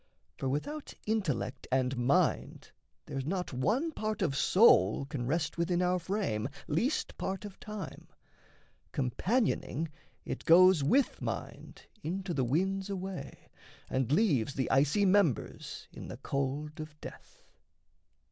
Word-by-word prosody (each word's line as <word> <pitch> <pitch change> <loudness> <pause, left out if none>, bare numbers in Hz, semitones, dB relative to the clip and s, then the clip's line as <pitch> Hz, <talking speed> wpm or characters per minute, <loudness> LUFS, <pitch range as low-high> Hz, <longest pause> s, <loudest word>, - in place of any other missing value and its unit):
For 135 - -2
without 285 - -4
intellect 150 - -1
and 130 0 +1
mind 125 +3 +1 0.3
there's 135 - -4
not 180 -3 -2
One 215 - +1
part 215 -6 -2
of 145 -6 0
soul 140 - +5
can 135 -4 -4
rest 160 +3 -1
within 175 +1 +1
our 180 0 +2
frame 165 - -1 0.2
Least 215 - 0
part 190 +2 -3
of 200 -2 -10
time; 210 -2 -7 0.8
companioning, 165 - 0 0.4
it - - -4
goes 180 -2 +7
With 260 - +2
mind - - -6 0.2
into 185 +2 -3
the 135 -4 +1
winds 190 +9 0
away, 190 -6 -6 0.4
and 130 0 0
leaves 145 - +2
The 130 - -1
icy 150 +9 +3
members 185 - +1
in - - -8
the - - -7
cold 140 +3 -3
of 155 -1 -8
death. - - -12
165 Hz, 130 wpm, -31 LUFS, 135-195 Hz, 0.8 s, goes